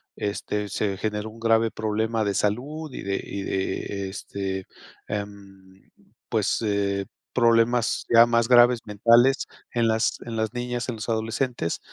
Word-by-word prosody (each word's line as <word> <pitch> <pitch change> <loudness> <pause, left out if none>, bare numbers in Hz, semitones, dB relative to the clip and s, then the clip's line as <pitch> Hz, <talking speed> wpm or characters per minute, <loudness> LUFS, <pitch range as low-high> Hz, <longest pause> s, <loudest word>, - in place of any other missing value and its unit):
este, 105 0 -3
se 100 -1 -1
generó 105 +1 -3
un 115 - -14
grave 115 0 +3
problema 110 +1 -1
de 100 -1 -1
salud 140 +8 -2
y - - -6
de 100 0 -2
y 100 - -5
de 95 0 -3
este, 95 -1 -5 0.4
em, 100 -2 -8 0.4
pues, - - 0
eh, 100 -2 0 0.3
problemas 115 -1 +3
ya 115 0 +9
más 115 -1 +2
graves, 120 -1 +6
mentales 115 +6 +4 0.2
en 120 -2 +1
las 110 0 +1
en 115 -1 -5
las 110 -1 -1
niñas, 125 0 -3
en 120 - -2
los 110 +1 -6
adolescentes. 115 -4 -1
110 Hz, 145 wpm, -25 LUFS, 100-120 Hz, 0.4 s, ya